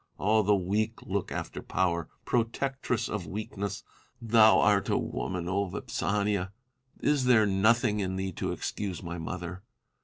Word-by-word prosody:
All 110 +2 +3
the 105 0 +3
weak 105 +4 -1
look - - -2
after - - -4
Power, 85 -3 -1 0.2
protectress 125 +1 -1
of 105 -5 -4
weakness. 100 +1 -4 0.4
Thou 110 -1 +6
art 105 -3 +3
a - - +2
woman, 85 +8 -3
Vipsania! 100 +1 -1 0.5
is 145 -3 +2
there 120 -4 +5
nothing 105 +3 +3
in 95 -2 -1
thee 95 0 -2
to - - -3
excuse 95 -5 -4
my 85 0 -5
mother 90 +2 -5
100 Hz, 140 wpm, -29 LUFS, 95-110 Hz, 0.5 s, Thou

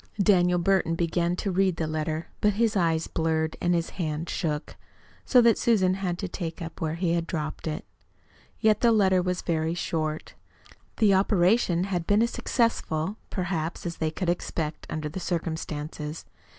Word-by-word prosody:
Daniel 180 -3 +4
Burton 175 -2 +2
began 170 +1 0
to 195 +2 -2
read 185 -1 +2
the 165 - -2
letter, 155 +1 -2 0.2
but 210 0 +3
his 225 +1 +1
eyes 165 -3 +2
blurred 160 -1 -1
and 175 0 +2
his 170 -1 -1
hand 155 0 -2
shook, 150 -4 -3 0.5
so 250 - +6
that 235 -1 +4
Susan 190 -6 +3
had 185 -2 -2
to 195 - -3
take 170 -2 -5
it 165 - -4
up 165 - -10
where 160 0 -1
he 170 -1 0
had 170 -1 -1
dropped 155 -1 -4
it. 155 - -4 0.7
Yet 215 -1 +3
the 235 - +5
letter 190 -4 +4
was 180 0 -2
very 160 0 0
short. 155 -2 -3 0.6
The 210 -3 +5
operation 190 -1 +3
had 180 -3 -2
been 205 +2 +4
as 235 - 0
successful, 210 -6 0
perhaps, 175 -2 -3
as 170 -1 -4
they 160 - 0
could 180 +3 -4
expect, 165 -3 -2
under 155 -1 -3
the 155 +5 -5
circumstances. 160 -3 -4
175 Hz, 175 wpm, -27 LUFS, 160-195 Hz, 0.7 s, so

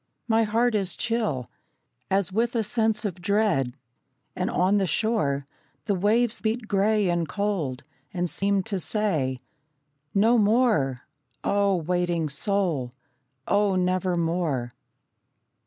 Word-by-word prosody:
My 225 -1 +3
heart 230 +3 +1
is 195 -4 0
chill 215 - -1 0.6
As 195 -2 +1
with 235 +3 0
a 225 - +2
sense 220 0 +1
of 185 -3 -4
dread, 185 - +1 0.6
and - - -1
on 190 +3 +2
the 190 - +1
shore 150 -7 0 0.4
The 205 - +1
waves 215 +5 +1
beat 220 +1 -2
grey 205 0 +2
and 170 -3 0
cold, 185 -11 -2 0.3
and 180 -1 -1
seem 200 +2 +1
to 200 -2 -3
say: 155 - -1 0.7
"No 225 +4 +4
more, 210 - +2 0.5
oh, 200 -1 +2
waiting 175 -1 -1
soul, 160 - 0 0.6
oh 205 -1 +2
nevermore!" 175 -7 0
195 Hz, 120 wpm, -25 LUFS, 170-215 Hz, 0.7 s, No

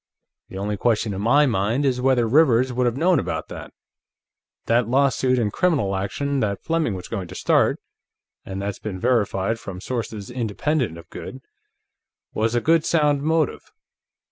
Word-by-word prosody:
The 95 - -8
only 105 +1 -2
question 110 -1 +1
in 95 - -4
my 140 +7 +4
mind 115 +3 0
is 125 -2 +1
whether 125 -3 +3
Rivers 130 -2 +4
would 125 0 +1
have 120 +1 -1
known 170 +1 +3
about - - -4
that. - - -8 0.9
That 115 0 +2
lawsuit 130 0 +2
and 110 -4 0
criminal 140 - +1
action 140 +9 -2
that 100 -4 -2
Fleming 160 -10 0
was 90 - -7
going 100 -6 -4
to - - -10
start - - +2 0.6
and 95 0 -6
that's 100 -1 -4
been 100 -4 -5
verified 115 -2 0
from 95 -4 -8
sources 110 -2 -5
independent 120 - -1
of 85 0 -12
Goode 130 0 -8 0.9
was 115 +2 0
a 120 - +2
good 165 +2 +3
sound 150 -4 +2
motive. 160 0 0
120 Hz, 165 wpm, -23 LUFS, 100-140 Hz, 0.9 s, my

